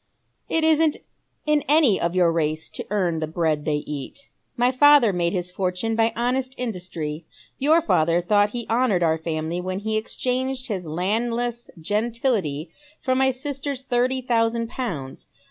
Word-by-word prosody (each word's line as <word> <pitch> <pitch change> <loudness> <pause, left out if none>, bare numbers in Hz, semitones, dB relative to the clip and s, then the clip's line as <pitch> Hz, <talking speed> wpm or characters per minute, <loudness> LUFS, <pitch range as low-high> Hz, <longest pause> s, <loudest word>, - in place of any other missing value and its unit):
"It 325 - +1
isn't 315 -1 +3 0.5
in 300 -2 +2
any 290 -8 +4
of 170 +1 -1
your 175 -2 +4
race 155 -1 -1
to - - -6
earn 180 -5 0
the 155 - -2
bread 155 -2 0
tliey 150 -1 0
eat. 150 - -7 0.3
My 245 +1 +3
father 275 -4 +6
made 170 -1 0
his 180 -1 -3
fortune 185 +4 -1
by 225 0 +2
honest 255 +2 -1
industry, 170 -9 -5 0.3
your 310 +4 +4
father 165 - +2
thought 205 +3 +3
he 235 +1 -5
honoured 225 -6 +2
our 160 -1 +2
family 160 +1 -3
when 185 +1 -3
he 220 +1 -1
exchanged 255 +3 -2
his 185 -5 -3
landless 230 +8 -2
gentility 210 - -1 0.3
for 260 - 0
my 265 +1 +3
sister's 270 +1 -4
thirty 255 0 0
thousand 230 -1 +1
pounds. 165 - -5
220 Hz, 155 wpm, -23 LUFS, 170-255 Hz, 0.5 s, father